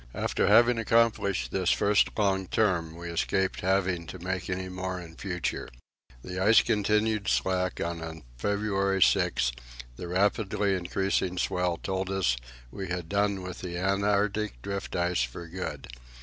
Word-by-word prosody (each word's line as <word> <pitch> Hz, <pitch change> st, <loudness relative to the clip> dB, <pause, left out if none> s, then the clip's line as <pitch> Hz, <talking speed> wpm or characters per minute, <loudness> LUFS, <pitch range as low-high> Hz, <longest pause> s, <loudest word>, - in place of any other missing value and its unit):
After -, -, 0 dB
having 120 Hz, 0 st, +6 dB
accomplished 110 Hz, -, +2 dB
this -, -, +1 dB
first 105 Hz, +1 st, +3 dB
long 95 Hz, -3 st, +1 dB
turn, 85 Hz, -7 st, +1 dB
we 85 Hz, 0 st, -6 dB
escaped 95 Hz, +3 st, 0 dB
having 95 Hz, -2 st, +1 dB
to -, -, -7 dB
make 90 Hz, 0 st, -4 dB
any 95 Hz, 0 st, -2 dB
more 95 Hz, 0 st, -4 dB
in 85 Hz, -2 st, -10 dB
future. 90 Hz, -3 st, -3 dB, 0.5 s
The 90 Hz, 0 st, -5 dB
ice 105 Hz, +4 st, +6 dB
continued 105 Hz, -1 st, +1 dB
slack, 90 Hz, -1 st, 0 dB
and 85 Hz, -1 st, -3 dB
on 80 Hz, -1 st, -7 dB
February 100 Hz, -, +1 dB
6 -, -, +2 dB, 0.5 s
the 90 Hz, -, -6 dB
rapidly 100 Hz, +2 st, +1 dB
increasing 95 Hz, 0 st, -1 dB
swell 90 Hz, -2 st, 0 dB
told 95 Hz, 0 st, -3 dB
us 95 Hz, -11 st, +1 dB, 0.4 s
that -, -, -16 dB
we 95 Hz, -1 st, -4 dB
had 90 Hz, -2 st, -4 dB
done 100 Hz, -1 st, +1 dB
with 90 Hz, 0 st, -7 dB
the 85 Hz, -2 st, -5 dB
Antarctic 100 Hz, -, 0 dB
drift 100 Hz, 0 st, -4 dB
ice 85 Hz, -4 st, +1 dB
for -, -, -4 dB
good. 80 Hz, -5 st, -5 dB
95 Hz, 150 wpm, -28 LUFS, 90-100 Hz, 0.5 s, having